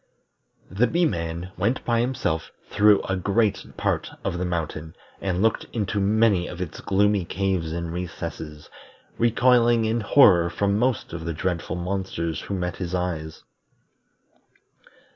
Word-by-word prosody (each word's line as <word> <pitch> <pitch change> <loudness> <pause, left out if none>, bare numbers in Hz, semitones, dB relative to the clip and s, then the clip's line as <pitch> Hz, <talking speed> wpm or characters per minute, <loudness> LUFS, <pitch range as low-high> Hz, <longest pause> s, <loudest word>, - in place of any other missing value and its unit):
The 110 +7 +2
Bee 175 +1 +2
man 85 - -3
went 125 +3 0
by 120 -1 +2
himself 120 -10 -1 0.2
through 105 -1 +5
a 95 - -1
great 100 +3 +1
part - - -1
of 90 - -2
the 90 - -1
mountain, 80 -2 -4 0.3
and 95 0 0
looked 115 - +1
into 105 -2 -1
many 100 -2 +3
of 85 - -8
its 90 -4 -5
gloomy 100 0 +2
caves 95 -3 -1
and 85 0 -4
recesses, 80 -3 -6 0.5
recoiling 120 0 +4
in 110 +2 +1
horror 95 -7 +5
from 100 +3 0
most 125 -6 0
of 85 -1 -5
the 85 0 -3
dreadful 85 -1 -2
monsters 90 -3 -3
who 100 - -4
met 90 -2 -3
his 90 -1 -3
eyes. 85 -3 -4
95 Hz, 140 wpm, -24 LUFS, 85-110 Hz, 0.5 s, through